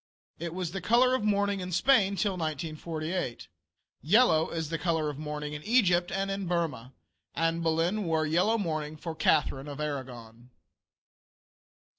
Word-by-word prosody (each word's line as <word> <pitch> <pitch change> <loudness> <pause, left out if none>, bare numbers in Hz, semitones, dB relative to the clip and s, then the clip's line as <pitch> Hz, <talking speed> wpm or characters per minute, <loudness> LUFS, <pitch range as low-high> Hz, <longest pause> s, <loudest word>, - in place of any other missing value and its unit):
It 170 +1 -5
was 180 -3 -3
the 195 0 -4
color 245 +7 +4
of 260 - 0
mourning 205 -1 +1
in 180 0 -5
Spain 200 0 +3
till 200 +1 +1
1498. 155 - -4 0.5
Yellow 165 -3 +4
is 160 -2 -3
the 165 0 -2
color 160 -4 0
of 145 - -10
mourning 150 -1 -5
in 150 - -6
Egypt 180 -5 +3
and 195 0 -1
in 195 -1 -3
Burmah. 155 -9 -2 0.4
Anne 165 0 0
Boleyn 165 +5 0
wore 160 -1 +1
yellow 180 +9 +2
mourning 155 -6 -3
for 165 +1 -5
Catharine 150 -3 +1
of 145 0 -7
Aragon. 125 -5 -6
165 Hz, 150 wpm, -29 LUFS, 150-195 Hz, 0.5 s, color